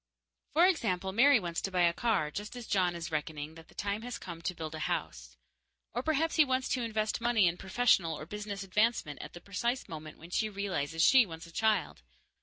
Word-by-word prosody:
For 335 +4 +6
example, 190 - +1
Mary 255 +5 +6
wants 170 -3 -3
to - - -2
buy 180 -2 +2
a 170 -1 +4
car, 195 -9 0
just 205 +8 -6
as 245 -2 -7
John 185 -4 +1
is 170 -1 -5
reckoning 150 0 -3
that 160 0 -14
the - - -20
time 200 +1 -2
has 245 +1 -5
come 170 -3 -8
to 180 +1 -3
build 160 -2 -6
a 155 - -5
house. - - -3 0.6
Or 245 - -1
perhaps 315 +3 0
he 310 - +8
wants 260 -2 0
to 255 - 0
invest 220 -1 -1
money 235 -4 +3
in 170 0 +2
professional 190 -5 +2
or 155 - -7
business 205 +1 -5
advancement 200 -6 0
at - - -9
the 175 - -10
precise 235 +6 -2
moment 155 -1 -8
when 170 +2 -13
she 215 +4 +1
realizes 180 -6 -1
she 260 -5 +7
wants 165 -1 -8
a 170 - -13
child. 215 - 0
195 Hz, 215 wpm, -31 LUFS, 165-230 Hz, 0.6 s, he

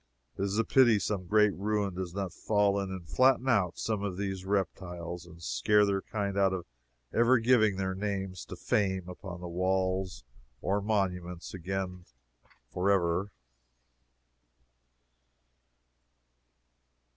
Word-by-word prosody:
It 95 - -6
is 100 +1 0
a 115 - +3
pity 120 -3 +5
some 100 -3 -2
great 105 0 +4
ruin 100 0 -1
does 90 -1 -5
not 95 -3 -3
fall 100 -1 +2
in 100 -1 -3
and 95 -3 -7
flatten 130 0 +3
out 100 -8 +2
some 110 -3 -1
of 100 -3 -3
these 95 -2 -3
reptiles, 90 -3 -3
and 85 0 -14
scare 105 - +3
their 100 -1 0
kind 100 -2 -3
out 95 -1 +3
of 90 -2 -4 0.5
ever 120 +3 +5
giving 115 -3 +4
their 95 0 -1
names 95 -2 -3
to - - -8
fame 95 -3 0
upon 90 -1 -8
any 90 -1 -6
walls 95 0 0 0.4
or 100 +8 0
monuments 90 -4 -2
again, 90 0 -4 0.7
forever. 90 0 +1
95 Hz, 130 wpm, -30 LUFS, 90-105 Hz, 0.7 s, pity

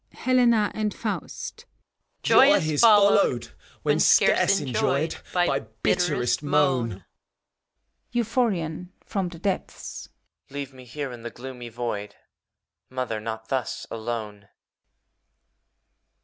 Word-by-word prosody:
] - - -51
HBLEKA 240 -4 +3
AND 215 -1 -2
l^AUl^. 215 -2 -5 0.6
Joy 275 +3 +7
is 155 - +1
f 230 - +9
ollowedi 205 -1 +4 0.3
when - - +2
scaree - - +5
enjoyed. 140 +3 0 0.2
By 175 -6 +2 0.2
bitterest 145 -10 +1
moan. 135 - +1 1.1
BUPH(MaoN 210 -9 -1 0.2
(from 195 -4 -2
the 170 -2 -11
<teplM). 195 +1 -4 0.4
Leave 140 -1 -6
me 130 -1 -14
here^ 135 +2 -5
in 120 - -10
the 120 - -5
i^oomy 125 -1 -9
Void, 105 -3 -4 0.7
Mother, 125 -4 -3
not 110 0 -6
tiios 130 -3 -2
alone! 110 -3 -5
140 Hz, 105 wpm, -25 LUFS, 120-195 Hz, 1.1 s, f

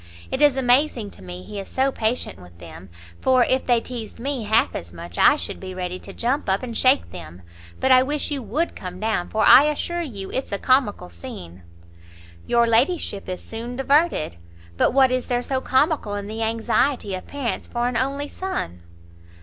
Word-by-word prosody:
It 265 - -2
is 290 -3 +5
amazing 250 -3 +2
to - - -13
me 90 0 -8
he 205 - -7
is 195 - -8
so 270 +1 +1
patient 225 - -2
with 90 -1 -15
them, 85 +2 -11 0.3
for 255 -1 +4
if 260 +2 +1
they 240 -2 +4
teized 230 -2 -7
me 260 -2 -3
half 220 +2 +3
as 85 - -6
much, 85 0 -8
I - - +7
should 85 - -5
be 185 -1 -7
ready 180 0 -4
to - - -11
jump 245 +3 -1
up 190 +5 +1
and 235 -2 -5
shake 260 +4 +3
them. 85 +2 -10 0.4
But 265 - +2
I 255 0 +8
wish 290 +3 -2
you 280 -2 -2
would 300 +9 -2
come 180 -1 -7
down, 215 -5 -1
for 215 -1 +1
I 275 - +9
assure 345 +3 -1
you 205 - -6
it's 265 - -3
a 200 - 0
comical 255 - +1
scene." 85 +1 -9 0.9
"Your 235 0 +4
ladyship 230 - +1
is 185 - -5
soon 235 +2 -6
diverted! 275 - +1 0.4
but - - +3
what 265 0 +4
is 255 -1 -1
there 245 0 0
so 265 0 -1
comical 265 -6 +1
in 205 0 -4
the 220 +2 -5
anxiety 225 0 0
of 185 - -6
parents 280 -5 -3
for 240 0 -1
an 250 - -2
only 280 +3 -1
son?" 190 - -4
235 Hz, 200 wpm, -23 LUFS, 190-265 Hz, 0.9 s, I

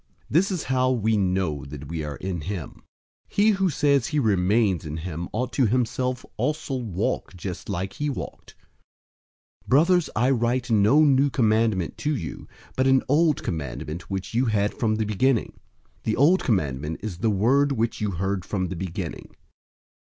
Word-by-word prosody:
This 175 +7 +3
is 185 -5 -2
how 130 0 +1
we 110 -3 +1
know 90 -7 0
that 75 0 -8
we 80 0 -4
are 75 -1 -4
in 90 -3 -4
him: 90 -1 -6 0.5
002:006 - - -26
he 205 +2 +5
who 195 -2 +1
says 140 -5 +2
he 150 - -2
remains 100 - +2
in 75 0 -5
him 85 +1 -5
ought 125 +3 -3
himself 125 0 0
also 150 -3 -1
to - - -5
walk 100 -2 -2
just 90 +2 -6
like 95 0 -3
he 150 0 -2
walked. 140 - -7 1.1
002:007 - - -30
Brothers, 170 +5 +4
I 125 +5 +3
write 125 0 0
no 110 +8 +5
new 140 -1 +4
commandment 110 - +1
to 150 0 0
you, 85 -10 -6 0.3
but 130 0 +2
an 135 0 +4
old 150 +1 +3
commandment 75 +2 -5
which 95 +2 -4
you 120 +3 +2
had 105 -3 +1
from 110 -2 0
the 110 0 -1
beginning. 115 +4 0 0.4
The 110 - -1
old 165 +8 +4
commandment 75 - -1
is 95 -6 -5
the 110 - +1
word 130 +8 +3
which 115 -4 -1
you 105 - 0
heard 95 +1 -2
from 95 -2 -2
the 95 - -4
beginning. 90 0 -6
110 Hz, 175 wpm, -25 LUFS, 90-130 Hz, 1.1 s, he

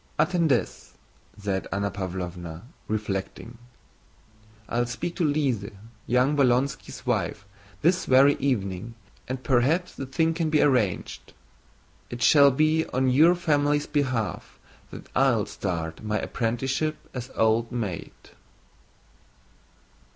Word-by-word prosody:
"Attendez," 170 -6 0 0.4
said 100 -2 -3
Anna 100 +1 -1
Pávlovna, 90 -3 -6 0.2
reflecting, 105 +2 -4 1.1
"I'll 120 +1 0
speak 170 +8 -4
to 180 - 0
Lise, 140 -9 0 0.4
young 125 +5 +2
Bolkónski's 135 0 0
wife, 105 - -1 0.4
this 180 +3 +3
very 135 +2 +6
evening, 115 -4 -2 0.3
and 130 +1 -5
perhaps 140 +8 +1
the 135 - -6
thing 160 +5 +1
can 165 -1 -1
be 155 -1 +2
arranged. 125 -11 0 0.8
It 120 +1 -4
shall 140 -2 +7
be 155 +4 +2
on 130 0 0
your 160 +7 +6
family's 145 -4 +1
behalf 130 -7 -2 0.3
that - - -10
I'll - - +3
start 85 -4 -4
my 105 0 -1
apprenticeship 135 +8 -1 0.2
as 125 -1 -6
old 110 +1 +2
maid." 105 -9 -4
125 Hz, 110 wpm, -26 LUFS, 105-145 Hz, 1.1 s, shall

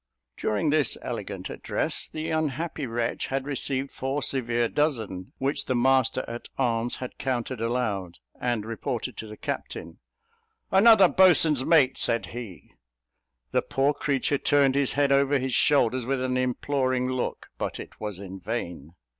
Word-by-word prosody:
During 110 +8 0
this 150 -4 +2
elegant - - -5
address, - - -2
the 160 +1 -4
unhappy 155 -1 -2
wretch 115 0 -2
had 135 0 -2
received 135 -1 -2
four 135 +2 -3
severe 120 -3 0
dozen, 110 - -1
which 135 +2 -1
the 130 - +1
master 130 0 +2
at 120 +1 -7
arms 120 -2 0
had 125 - -8
counted 125 -2 -2
aloud, 110 -7 -2 0.2
and 120 -4 -1
reported 120 +1 -4
to 110 - -6
the 105 0 -10
captain. - - -5 0.7
"Another 200 0 +7
boatswain's 165 -7 +5
mate," 140 -4 +4
said 115 0 +1
he. 115 -7 -9 0.8
The - - +2
poor 140 +2 +1
creature 140 -1 0
turned 140 -3 +3
his 140 -1 +1
head 140 -1 +2
over 140 +1 +4
his 130 -1 -2
shoulders 130 -4 +3
with 135 0 0
an 130 0 -1
imploring 130 0 0
look, 130 -1 -3
but - - -3
it - - -10
was 105 -3 -4
in 95 0 -8
vain. 90 - -5
130 Hz, 150 wpm, -26 LUFS, 115-140 Hz, 0.8 s, Another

